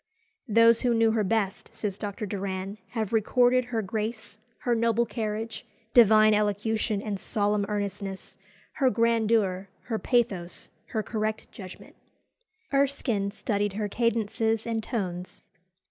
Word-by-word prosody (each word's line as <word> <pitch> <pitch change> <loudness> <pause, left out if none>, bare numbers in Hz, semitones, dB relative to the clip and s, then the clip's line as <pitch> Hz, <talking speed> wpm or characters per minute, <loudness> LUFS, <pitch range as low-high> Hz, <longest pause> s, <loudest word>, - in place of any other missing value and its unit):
"Those 230 +1 +5
who 245 -2 +2
knew 225 0 +4
her 220 -1 +1
best," 200 -1 -1
says 200 -2 -3
Dr. 205 0 -4
Doran, 195 0 -4 0.2
"have 220 -1 -2
recorded 245 +3 +3
her 230 -3 -2
grace, 215 +1 -4 0.2
her 245 - +1
noble 230 0 +2
carriage, 220 0 -4 0.3
divine 215 -2 +7
elocution 210 0 0
and 205 -2 -3
solemn 205 +1 0
earnestness, 200 -2 -4 0.4
her 270 -3 +4
grandeur, 220 -4 +1
her 225 -3 -3
pathos, 200 -8 -1 0.2
her 220 - -2
correct 215 0 -3
judgment." 185 -3 -11 0.8
Erskine 270 -7 +1
studied 205 -1 -2
her 210 +1 -2
cadences 225 0 0
and 225 -1 -1
tones. 185 -6 -5
215 Hz, 125 wpm, -27 LUFS, 200-230 Hz, 0.8 s, divine